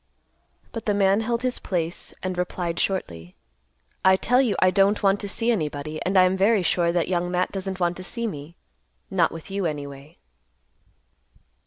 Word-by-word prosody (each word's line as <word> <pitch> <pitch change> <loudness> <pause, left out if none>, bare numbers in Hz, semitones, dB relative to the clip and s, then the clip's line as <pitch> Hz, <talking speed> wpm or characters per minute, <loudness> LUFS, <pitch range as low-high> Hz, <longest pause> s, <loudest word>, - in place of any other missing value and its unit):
But 225 - -7
the 205 - +2
man 195 0 +3
held 235 +2 -1
his 255 -1 0
place, 170 -2 -3
and 185 -1 -2
replied 175 -1 -2
shortly, 90 - -3 0.7
"I 190 0 +6
tell 245 +6 +3
you 230 -7 +1
I 185 - +4
don't 200 +3 +3
want 195 0 +3
to 205 - -4
see 230 +4 0
anybody, 155 -5 -3
and 190 +2 +1
I 185 - +8
am 185 +1 +3
very 200 +1 +3
sure 170 0 +2
that 175 -1 0
Young 175 -1 0
Matt 180 0 0
doesn't 190 -1 -4
want 175 -1 0
to 185 - -7
see 235 +5 -3
me, 155 -5 -6 0.6
not 180 -3 +2
with 165 +3 -9
you, 195 -2 0
anyway." 140 -1 -7
185 Hz, 180 wpm, -24 LUFS, 170-200 Hz, 0.7 s, I